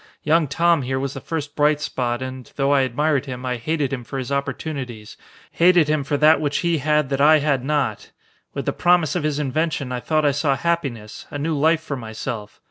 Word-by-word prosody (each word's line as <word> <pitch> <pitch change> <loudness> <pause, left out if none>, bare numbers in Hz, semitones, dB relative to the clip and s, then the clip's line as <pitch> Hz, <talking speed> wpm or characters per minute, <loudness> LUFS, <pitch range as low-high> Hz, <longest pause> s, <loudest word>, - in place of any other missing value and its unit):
Young 155 +1 +3
Tom 170 +2 +2
here 130 +1 -2
was 135 0 -3
the - - -7
first 150 -3 -5
bright 150 0 +3
spot 125 -4 -2
and, 130 -1 -8
though 140 0 +1
I 140 -1 +4
admired 140 +3 0
him, 125 -1 -6
I 125 -1 -1
hated 145 +3 -1
him 125 -3 -4
for 135 - -6
his 130 0 -4
opportunities, 140 -5 -4 0.4
hated 175 -3 +4
him 155 -2 +1
for 145 +1 -1
that 155 +2 +5
which 145 -2 0
he 170 -2 +2
had 150 0 +1
that 140 0 -1
I 155 +2 +7
had 140 -4 0
not. 135 -7 -1 0.5
With - - -3
the - - 0
promise 175 -3 +2
of 180 - 0
his 150 -1 -1
invention 150 -1 -1
I 125 - -2
thought 155 +4 0
I 145 - +4
saw 140 0 +1
happiness, 135 -11 -3
a - - -5
new 155 +2 -1
life 160 +2 +2
for 145 - -4
myself. 110 -2 -6
145 Hz, 215 wpm, -22 LUFS, 130-155 Hz, 0.5 s, I